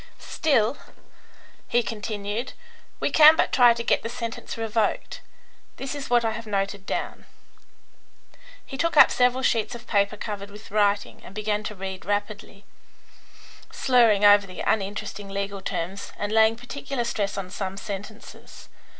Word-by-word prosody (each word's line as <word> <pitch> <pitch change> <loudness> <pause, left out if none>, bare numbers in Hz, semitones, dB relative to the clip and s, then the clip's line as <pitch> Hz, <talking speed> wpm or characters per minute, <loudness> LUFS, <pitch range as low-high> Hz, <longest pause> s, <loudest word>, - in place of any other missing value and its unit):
Still," 275 -5 +1 0.9
he 240 0 +2
continued, 215 +2 -4 0.5
"we - - -1
can 310 0 +8
but - - +1
try 245 -3 +6
to 235 - -4
get - - +2
the 230 - -5
sentence 230 -2 -6
revoked. 225 -1 -1 0.5
This 270 +1 -5
is 285 -2 -6
what 240 -1 +3
I 225 - +1
have 225 0 -7
noted 200 -1 -2
down." - - -4 1.4
He 270 - -8
took 335 -1 0
up - - +8
several 250 +1 +2
sheets 225 -2 +1
of 240 0 -11
paper 200 -1 +1
covered 205 -1 -6
with 210 +1 -13
writing, 205 -1 +1
and 195 - -13
began 210 0 -1
to 210 - -5
read 190 -1 -6
rapidly, 205 0 -4 1.1
slurring 230 -5 +4
over 205 -1 +6
the 185 - -8
uninteresting 200 -1 -2
legal 200 0 -4
terms 190 +3 -4
and 205 0 -3
laying 220 0 +4
particular 245 +1 -5
stress 210 -4 -2
on 185 -2 -5
some 195 -1 -4
sentences. 200 +2 -9
215 Hz, 150 wpm, -25 LUFS, 200-235 Hz, 1.4 s, can